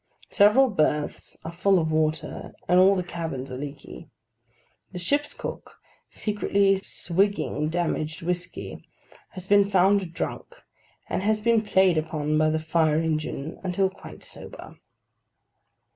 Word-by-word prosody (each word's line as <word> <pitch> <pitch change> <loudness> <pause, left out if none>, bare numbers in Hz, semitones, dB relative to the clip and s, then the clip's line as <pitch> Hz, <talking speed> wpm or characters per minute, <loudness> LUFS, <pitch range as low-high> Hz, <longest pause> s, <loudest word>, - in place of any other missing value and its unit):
Several 215 +7 +5
berths 150 -4 -1
are 165 - -4
full 190 +3 +2
of 160 -2 0
water, 155 0 -1
and 180 +1 +5
all 195 +2 +6
the 180 - -1
cabins 160 -7 -5
are 125 - -5
leaky. 145 +3 -9 0.8
The - - -5
ship's 285 +12 0
cook, - - -7 0.3
secretly 200 -2 +1
swigging 185 -6 0
damaged 160 -2 -2
whiskey, 180 +1 -4 0.5
has 185 -2 -8
been 200 0 +4
found 195 -1 +3
drunk; 485 - -5 0.5
and - - -2
has 215 +2 +1
been 230 0 +3
played 190 -5 +3
upon 155 -1 -2
by 155 0 +3
the 155 - +1
fire 155 -1 +1
engine 155 -1 -3
until 190 +1 0
quite 195 - -12
sober. - - -10
175 Hz, 130 wpm, -25 LUFS, 155-200 Hz, 0.8 s, all